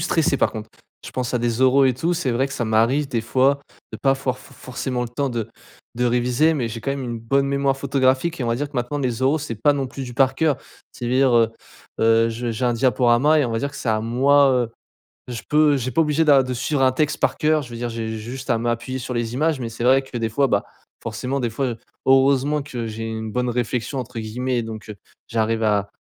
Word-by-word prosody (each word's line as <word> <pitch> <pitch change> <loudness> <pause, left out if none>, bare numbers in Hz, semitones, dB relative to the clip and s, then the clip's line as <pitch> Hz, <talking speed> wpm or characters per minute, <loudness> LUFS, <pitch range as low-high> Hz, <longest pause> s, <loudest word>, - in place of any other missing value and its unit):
stressé, 160 -4 +1
par - - +1
contre. 110 -1 -7 0.3
Je - - -8
pense 125 -2 -3
à 125 - +1
des 120 +1 0
oraux 135 +1 +5
et 130 - +2
tout, 165 +8 -1
c'est 165 -7 -1
vrai 130 +3 +1
que 135 - -9
ça 120 - -2
m'arrive, 115 +6 +2
des 115 -4 -1
fois, 135 +4 +2 0.3
de - - -4
pas 135 -1 +2
for 130 -1 -2
f - - -16
forcément 125 0 -4
le 120 - -4
temps 135 +3 -2
de 115 -2 -3 0.5
de 125 - 0
réviser, 125 +6 +2
mais 125 -6 -1
j'ai 115 0 -6
quand 135 - -1
même 140 -1 -4
une 120 -2 -4
bonne 135 +5 +1
mémoire 140 -1 +1
photographique 135 +4 +1
et, 130 - -2
on - - -2
va 115 - +1
dire 145 +2 -3
que, 140 - -8
maintenant, 125 +4 -2
les 130 -3 -2
oraux, 140 +4 +3
c'est 140 -6 -4
pas 145 +7 +3
non 140 -2 -2
plus 135 +1 -6
du 125 - -8
par 135 0 +3
cœur. 155 -4 +2 0.4
Ça 120 - -6
veut - - -1
dire, 130 0 +4
heu 115 -1 +5 0.5
heu, 115 0 +4
je 115 +1 -3
j'ai 115 +3 -2
un 120 - +1
diaporama 125 +4 +3
et, - - +2
on - - -4
va 115 - -1
dire 140 +2 -2
que 140 - -11
c'est - - -4
à 110 -1 +2
moi, 135 +4 +4
heu 120 -2 0 0.6
je 120 -2 -5
peux, 150 -1 +4
j'ai 130 0 -3
pas 165 +7 +3
obligé 155 +1 +1
d'a 140 -3 +6
de 130 0 -3
suivre 135 +3 -1
un 130 -1 +4
texte 150 +3 0
par - - +1
cœur 155 -1 +2
je 120 - -11
veux - - -8
dire 120 +1 -3
j'ai 115 -1 -4
juste 125 +5 -7
à 120 -3 +2
m'appuyer 120 +3 -2
sur 125 - -5
les 120 0 -2
images 155 +1 +1
mais 120 -2 -4
c'est 115 - -7
vrai 130 +2 +4
que 130 - -9
des 115 - -1
fois, 135 +6 +2
bah, - - +1 0.4
forcément 125 +4 -3
des 120 - -1
fois, 135 +5 -2
heu 120 -3 -3 0.3
heureusement 135 +2 +3
que 120 -5 -5
j'ai 110 +1 -6
une 110 -1 -5
bonne 125 +1 0
réflexion 120 +2 -2
entre 125 -2 -5
guillemets 120 +2 -2
donc, 110 -1 -8
heu, - - -6 0.3
j'arrive 115 0 0
à 100 -1 +1
125 Hz, 260 wpm, -22 LUFS, 115-140 Hz, 0.6 s, d'a